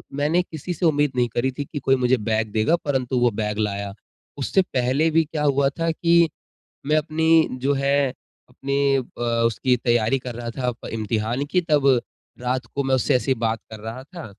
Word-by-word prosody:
मैंने 150 +5 +2
किसी 165 +2 -6
से 175 - -2
उम्मीद 145 -2 +2
नहीं 120 -1 +2
करी 130 +2 +1
थी 145 - -2
की 145 - -6
कोई 135 0 +2
मुझे 130 0 +2
बैग 110 -1 0
देगा 110 +10 +2
परंतु 130 -3 0
वो 120 0 +4
बैग 105 0 -2
लाया। 100 -1 -2 0.4
उससे 145 +7 +2
पहले 135 -1 +1
भी 165 +1 +4
क्या 150 -1 -4
हुआ 140 -1 +3
था 165 0 +1
कि 170 0 +3 0.6
मैं 155 +1 +3
अपनी 160 +1 +3
जो 140 +2 +2
है 140 0 +2 0.4
अपनी 140 +2 0
अ, 125 -1 -6 0.2
उसकी 125 +3 +1
तैयारी 120 +2 +1
कर 125 -2 -5
रहा 120 -1 -5
था 125 +1 -3
अ, - - -1
प - - -5
इम्तिहान 115 +4 -1
की 180 - +3
तब 135 -4 +4 0.4
रात 125 0 -1
को 140 - 0
मैं 135 0 +2
उससे 125 - +1
ऐसे 130 +2 0
ही - - +3
बात 115 -1 0
कर 110 - -8
रहा 115 +4 -7
था, 170 +2 -10
135 Hz, 205 wpm, -23 LUFS, 120-150 Hz, 0.6 s, वो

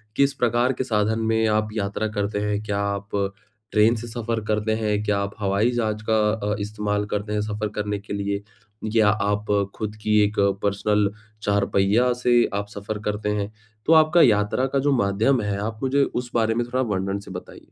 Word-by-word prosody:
किस 140 0 +3
प्रकार 120 +2 +1
के 130 - -2
साधन 110 -2 0
में 110 0 +1
आप 110 0 +1
यात्रा 105 0 -2
करते 105 -1 -2
हैं? 105 0 -1
क्या 100 -2 -2
आप 100 0 -2 0.6
ट्रेन 110 +2 +4
से 120 +1 -6
सफ़र 115 -1 -3
करते 110 0 0
हैं? 105 -1 0
क्या 105 -1 +1
आप 100 +1 -3
हवाई 100 +4 +2
जहाज़ 110 -3 -1
का 110 - +4 0.4
अ, - - -1
इस्तेमाल 105 0 -2
करते 105 +1 -3
हैं, 105 - 0
सफ़र 105 0 -2
करने 105 -1 -2
के 100 - -8
लिए? 100 0 -2 0.5
या 110 -2 +5
आप 105 0 0 0.3
खुद 105 -1 -4
की 105 0 +3
एक 105 +1 0 0.3
पर्सनल 100 0 +1 0.3
चार-पहिया 100 +4 +2
से 125 - +4 0.2
आप 100 0 -2
सफ़र 105 +1 -5
करते 105 0 -1
हैं? 105 0 -2 0.3
तो 165 - +5
आपका 160 +2 +6
यात्रा 105 +3 +3
का 140 - +3
जो 145 +2 +2
माध्यम 105 +6 +2
है, 100 -1 -2
आप 110 +1 -4
मुझे 140 +2 +3
उस 125 -2 -3
बारे 115 -1 +2
में 120 0 0
थोड़ा 130 +2 0
वर्णन 95 +1 -2
से 100 -1 -11
बताइए। 90 - -10
105 Hz, 195 wpm, -23 LUFS, 100-115 Hz, 0.6 s, आपका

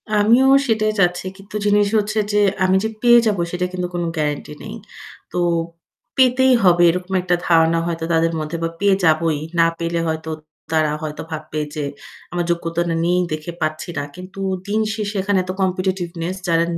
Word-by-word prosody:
আমিও 230 +6 +5 0.2
সেটাই 215 -2 +2
চাচ্ছি। 180 -1 +2
কিন্তু 200 +1 -13
জিনিস 205 0 +4
হচ্ছে 215 +1 0
যে 210 - +3 0.2
আমি 185 0 +3
যে 220 - 0
পেয়ে 240 -1 +7
যাব 210 -2 +1
সেটা 180 0 -1
কিন্তু 180 -1 -2
কোন 175 0 -2
গ্যারান্টি 150 -1 -2
নেই। - - -7 0.6
তো - - -4 0.8
পেতেই 260 0 +5
হবে 175 -2 +5
এরকম 180 +2 -2
একটা 180 0 +1
ধারণা 165 -1 +4
হয়তো 165 -1 -3
তাদের 165 0 +2
মধ্যে 155 +2 -4
বা 165 - 0
পেয়ে 200 -1 +4
যাবই। 160 -1 +2 0.2
না 165 - +6
পেলে 170 0 -1
হয়তো 160 0 -3 0.4
তারা 155 -1 +2
হয়তো 150 -1 -5
ভাববে 155 -1 -4
যে 150 - -2 0.5
আমার 175 -1 -1
যোগ্যতা 170 0 -1 0.2
নেই 180 +1 +2
দেখে 155 +2 -4
পাচ্ছি 155 +2 -2
না। 145 - -1
কিন্তু 185 +2 -10 0.3
দিনশেষে 215 0 -1
এখানে 195 -1 +1
তো - - -1
competitiveness 185 -2 -2
যারা 165 -1 +3
180 Hz, 170 wpm, -20 LUFS, 165-205 Hz, 0.8 s, পেয়ে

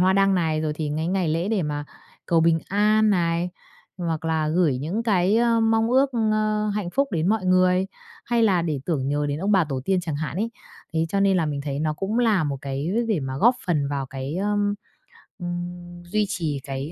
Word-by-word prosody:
hoa 185 +1 +4
đăng 195 0 +3
này, 160 -3 +1
rồi 155 -1 -1
thì 150 -1 -3
cái 160 +1 -1
ngày 185 -2 0
lễ 165 +5 0
để 210 -5 +1
mà 145 -1 -3 0.4
cầu 165 -1 +3
bình 165 0 +4
an 215 +2 +3
này, 170 -1 +1 0.5
hoặc 165 -2 -2
là 160 -1 0
gửi 155 -6 +2
những 175 - -2
cái, 200 -2 +2
ơ, 230 -1 +3
mong 225 0 +2
ước, 265 +2 +4
ơ, 215 -2 +1
hạnh 200 -5 -2
phúc 275 +7 +1
đến 165 +2 +1
mọi 215 -3 +1
người, 185 0 +3 0.4
hay 235 -1 +1
là 185 -6 +3
để 150 -5 -2
tưởng 140 -6 -1
nhớ 145 +1 0
đến 145 - -2
ông 195 +5 0
bà 190 -4 +4
tổ 135 -4 -3
tiên 190 +1 +1
chẳng 160 -4 -3
hạn 155 +1 -4
ấy. 225 +4 -1 0.4
Thế 165 0 +1
cho 195 +4 0
nên 195 -1 +3
là 165 - +1
mình 145 -2 -3
thấy 140 -1 -3
nó 155 0 0
cũng 200 +8 -2
là 215 -8 +3
một 140 -2 -2
cái 140 +4 -3 0.2
để 205 -8 +1
mà 135 -1 -4
góp 240 - +5
phần 150 -5 +1
vào 140 -2 -2
cái, 135 +2 -5
ơ, 195 - -1 0.9
ừm, 175 0 -6
duy 210 +4 0
trì 160 -8 -2
cái 135 +3 -5
175 Hz, 225 wpm, -24 LUFS, 155-205 Hz, 0.9 s, góp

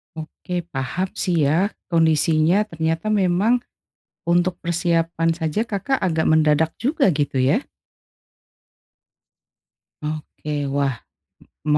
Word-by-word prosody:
Oke 175 +3 -5
paham 160 +8 -2
sih 170 -5 +1
ya, 165 +8 +3 0.2
kondisinya 160 +3 +3
ternyata 165 +1 -2
memang 205 +4 +2 0.7
untuk 175 +1 +2
persiapan 165 -1 0
saja, 160 +6 -1
Kakak 230 +4 -2
agak 160 -4 0
mendadak 155 0 +3
juga 270 - +2
gitu 140 -2 -1
ya. 140 - +2 2.4
Oke, 150 -1 -4
wah 140 -1 0 0.7
m 150 - 0
165 Hz, 95 wpm, -22 LUFS, 155-185 Hz, 2.4 s, ya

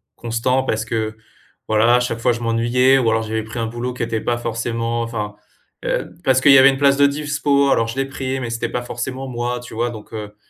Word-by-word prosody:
constant 120 +3 0
parce 110 -4 -1
que, 110 -1 -3 0.5
voilà, 110 +2 +4
à - - +2
chaque 125 -2 -2
fois 120 +1 +2
je 115 - -3
m'ennuyais 120 +3 +3
ou 125 -3 +1
alors 110 0 +1
j'avais 110 0 -3
pris 110 +2 -7
un 115 - -1
boulot 120 +2 -4
qui - - -7
était 115 -1 -1
pas 120 0 -1
forcément, 115 0 -2
enfin, 105 -3 -4 0.5
heu - - -2
parce 130 -1 +3
qu'il 145 - +6
y - - +9
avait 135 +1 +8
une 135 - -3
place 140 0 +4
de 140 - +5
dispo, 140 -1 +1
alors 115 - +3
je 115 - -6
l'ai 135 - +1
pris, 135 -1 -4
mais 120 -3 -4
c'était 115 0 -2
pas 125 - -2
forcément 130 +2 -5
moi, 120 0 -3
tu 120 -2 -10
vois? 120 +1 -1
Donc, 110 -2 -11
heu, 105 -1 -7
120 Hz, 240 wpm, -20 LUFS, 115-130 Hz, 0.5 s, y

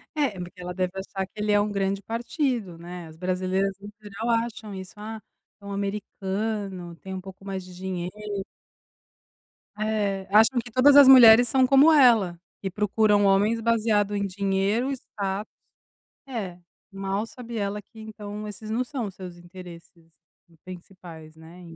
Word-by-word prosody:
É, 290 -6 +1
porque 180 +1 -9
ela 180 0 -5
deve 185 -1 -1
achar 190 0 -4
que - - -47
ele 210 0 0
é 205 - +4
um 210 0 -2
grande 195 0 -1
partido, 230 - -2
né, 175 0 -9
as 160 - -13
brasileiras 185 +2 -1
em 205 +1 -10
geral 210 +3 -5
acham 230 -2 -1
isso, 185 -2 -8
ah, 215 +1 -7 0.4
é - - -14
um 200 - -6
americano, 200 -2 -4
tem 190 +3 -9
um 185 - -5
pouco 195 +1 -12
mais 190 -1 -4
de 180 -1 -13
dinheiro. 180 -1 -5 1.7
Eh, 205 -3 -1
acham 225 +4 +5
que 240 - -12
todas 275 +4 +5
as 285 -2 +9
mulheres 245 -2 +9
são 260 +1 +3
como 280 +4 +6
ela, 225 - +5 0.2
e 195 - -1
procuram 210 +1 +2
homens 205 +4 +3
baseado 215 -3 +1
em 200 0 -1
dinheiro, 200 +6 0
status 205 -5 -5 0.7
é, 200 -9 -5 0.3
e 195 - -13
mal 195 +2 -2
sabe 235 -1 -9
ela, 200 0 -2
que 220 +2 -18
então, 210 -1 -8
esses 215 +1 -8
não 245 +3 0
são 250 -3 -4
os 195 - -7
seus 180 -2 -9
interesses 175 -2 -13 0.5
principais, 175 -3 -12
né, 165 +3 -14
200 Hz, 165 wpm, -25 LUFS, 185-220 Hz, 1.7 s, as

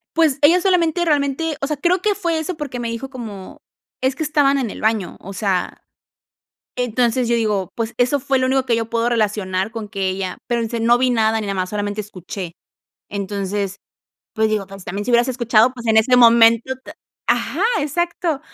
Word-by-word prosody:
pues, 315 -4 +3
ella 330 +5 +6
solamente 350 -3 +2
realmente 295 +1 0
o 275 - -1
sea, 300 0 -2
creo 350 +5 +1
que 415 0 +1
fue 340 -5 -1
eso 330 +3 -3
porque 280 -5 -5
me 235 -1 -3
dijo 230 +4 -5
como: 220 -8 -9 0.4
"Es 260 0 +1
que 315 - -3
estaban 290 -2 +2
en 255 -5 -1
el - - -8
baño", 215 -4 0
o 195 - -9
sea, 190 -2 -2 1.0
entonces, 245 0 +1
yo 235 - +2
digo, 210 -5 0
pues, 230 0 -3
eso 255 +3 +2
fue 270 +1 +1
lo 255 - +1
único 265 0 +1
que 235 - +2
yo 225 0 -3
puedo 230 0 +1
relacionar 210 -4 0
con 220 -2 -6
que 195 -2 -2
ella 185 -1 -3
pero 235 -1 0
dice: 230 +1 -3
"No 235 +2 +4
vi 255 0 +2
nada, 225 -2 +2
ni 215 - -4
nada 200 - -2
más, 185 -1 -2
solamente 205 0 -2
escuché", 185 -3 -7 0.6
entonces, 200 0 -3 0.5
pues 220 -1 +2
digo, 215 -2 0
entonces 195 -1 -11
también 200 +3 -4
si 245 - -2
hubieras 240 +1 +4
escuchado, 240 -2 +3
pues, 240 -2 -9
en 220 -1 +3
este 250 +3 +4
momento 230 +1 +6
te - - -10 0.4
Ajá, - - 0 0.2
exacto, 330 0 -1
235 Hz, 200 wpm, -20 LUFS, 205-270 Hz, 1.0 s, ella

